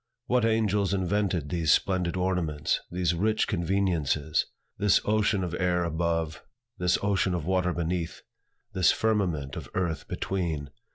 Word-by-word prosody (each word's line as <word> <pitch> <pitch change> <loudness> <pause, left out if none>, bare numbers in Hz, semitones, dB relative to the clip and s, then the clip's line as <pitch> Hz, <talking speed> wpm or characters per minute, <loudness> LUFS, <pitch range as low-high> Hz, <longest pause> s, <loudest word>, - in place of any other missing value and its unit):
What 125 -2 +2
angels 105 -3 +2
invented 95 -4 0
these 80 -3 +1
splendid 95 0 +1
ornaments, 90 -5 0
these 90 -1 0
rich 105 +5 +1
conveniences, 85 -5 0 0.3
this 105 -2 +4
ocean 105 -2 +2
of 85 -2 -3
air 90 -1 +1
above, 85 -1 -1 0.4
this 90 0 +2
ocean 100 -2 +1
of 85 -4 -3
water 90 0 +1
beneath, 85 -1 -3 0.5
this 95 -1 +4
firmament 90 -11 0
of - - -7
earth 85 -4 -1
between? 80 -7 -3
90 Hz, 130 wpm, -27 LUFS, 85-100 Hz, 0.5 s, this